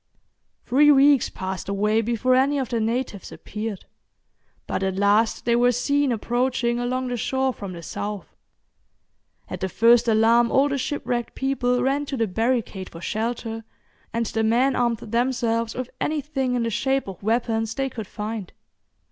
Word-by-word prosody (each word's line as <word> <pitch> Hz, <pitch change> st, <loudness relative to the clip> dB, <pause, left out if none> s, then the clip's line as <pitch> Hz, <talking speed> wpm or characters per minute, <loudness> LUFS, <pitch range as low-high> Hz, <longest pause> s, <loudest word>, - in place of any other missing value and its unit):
Three 295 Hz, +4 st, +5 dB
weeks 280 Hz, -1 st, +5 dB
passed 190 Hz, 0 st, -5 dB
away 210 Hz, +3 st, +1 dB
before 240 Hz, +3 st, +1 dB
any 270 Hz, +3 st, +3 dB
of 265 Hz, -3 st, -2 dB
the 235 Hz, -, -1 dB
natives 225 Hz, -2 st, -2 dB
appeared, 215 Hz, -2 st, -6 dB, 0.8 s
but -, -, -3 dB
at 190 Hz, -1 st, -1 dB
last 205 Hz, +3 st, +2 dB
they 235 Hz, 0 st, +3 dB
were 245 Hz, +1 st, +4 dB
seen 285 Hz, +3 st, +1 dB
approaching 240 Hz, +1 st, 0 dB
along 255 Hz, +1 st, -2 dB
the 245 Hz, -, -2 dB
shore 265 Hz, +3 st, 0 dB
from 200 Hz, -5 st, -7 dB
the 170 Hz, -1 st, -9 dB
south. 205 Hz, +4 st, -6 dB, 1.1 s
At -, -, -6 dB
the 190 Hz, -, -2 dB
first 235 Hz, +4 st, +4 dB
alarm 230 Hz, +2 st, +4 dB
all 275 Hz, +2 st, +3 dB
the 280 Hz, -1 st, -1 dB
ship 290 Hz, +3 st, -3 dB
wrecked 240 Hz, -1 st, -2 dB
people 250 Hz, -2 st, 0 dB
ran 280 Hz, +2 st, 0 dB
to 275 Hz, -, -3 dB
the 230 Hz, -, +2 dB
barricade 220 Hz, -2 st, -1 dB
for 165 Hz, -, -11 dB
shelter, 225 Hz, +3 st, -3 dB, 0.5 s
and 230 Hz, 0 st, -1 dB
the 225 Hz, 0 st, -2 dB
men 250 Hz, +4 st, +3 dB
armed 235 Hz, -2 st, +1 dB
themselves 230 Hz, 0 st, -1 dB
with 255 Hz, 0 st, -5 dB
anything 280 Hz, -4 st, -1 dB
in 240 Hz, -, 0 dB
the 230 Hz, -, -1 dB
shape 265 Hz, +3 st, 0 dB
of 190 Hz, -2 st, -8 dB
weapons 225 Hz, 0 st, 0 dB
they 270 Hz, -1 st, -1 dB
could 225 Hz, -6 st, -7 dB
find. 210 Hz, -2 st, -6 dB
235 Hz, 165 wpm, -24 LUFS, 220-260 Hz, 1.1 s, Three